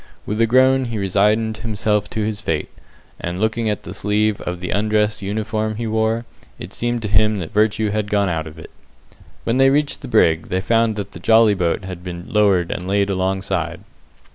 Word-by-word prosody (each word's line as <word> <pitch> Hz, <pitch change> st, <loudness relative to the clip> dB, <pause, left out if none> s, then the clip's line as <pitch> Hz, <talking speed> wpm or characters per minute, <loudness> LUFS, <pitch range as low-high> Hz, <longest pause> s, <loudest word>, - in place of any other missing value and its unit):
With 105 Hz, +2 st, -2 dB
a 115 Hz, -, +4 dB
groan 130 Hz, +2 st, +4 dB
he 115 Hz, -2 st, -4 dB
resigned 105 Hz, +3 st, +1 dB
himself 105 Hz, -2 st, -1 dB
to 110 Hz, -1 st, -2 dB
his 105 Hz, -1 st, -3 dB
fate, 80 Hz, -7 st, -2 dB, 0.5 s
and 85 Hz, +1 st, -4 dB
looking 110 Hz, +1 st, 0 dB
at 105 Hz, -, -2 dB
the 90 Hz, -, -7 dB
sleeve 105 Hz, +1 st, 0 dB
of 90 Hz, 0 st, -4 dB
the 90 Hz, -, -4 dB
undress 105 Hz, +1 st, +1 dB
uniform 110 Hz, +2 st, -2 dB
he 115 Hz, +2 st, -4 dB
wore, 110 Hz, +1 st, 0 dB, 0.3 s
it -, -, -9 dB
seemed 120 Hz, -1 st, -2 dB
to -, -, -1 dB
him 105 Hz, +1 st, +3 dB
that 85 Hz, -5 st, -6 dB
virtue 105 Hz, 0 st, +2 dB
had 105 Hz, -1 st, -2 dB
gone 100 Hz, -1 st, +2 dB
out 80 Hz, -3 st, -2 dB
of 80 Hz, 0 st, -11 dB
it. 80 Hz, -, -11 dB, 0.7 s
When 115 Hz, -, 0 dB
they 135 Hz, 0 st, +6 dB
reached 145 Hz, +1 st, 0 dB
the -, -, -7 dB
brig, 80 Hz, 0 st, +3 dB
they 95 Hz, -, -1 dB
found 115 Hz, +3 st, +1 dB
that 100 Hz, -1 st, -5 dB
the -, -, -10 dB
jolly 110 Hz, +3 st, +5 dB
boat 90 Hz, 0 st, -1 dB
had 90 Hz, -2 st, -7 dB
been 85 Hz, -1 st, -6 dB
lowered 100 Hz, -5 st, +2 dB
and 90 Hz, -, -4 dB
laid 100 Hz, 0 st, +1 dB
alongside. 95 Hz, -2 st, -2 dB
105 Hz, 200 wpm, -20 LUFS, 95-110 Hz, 0.7 s, they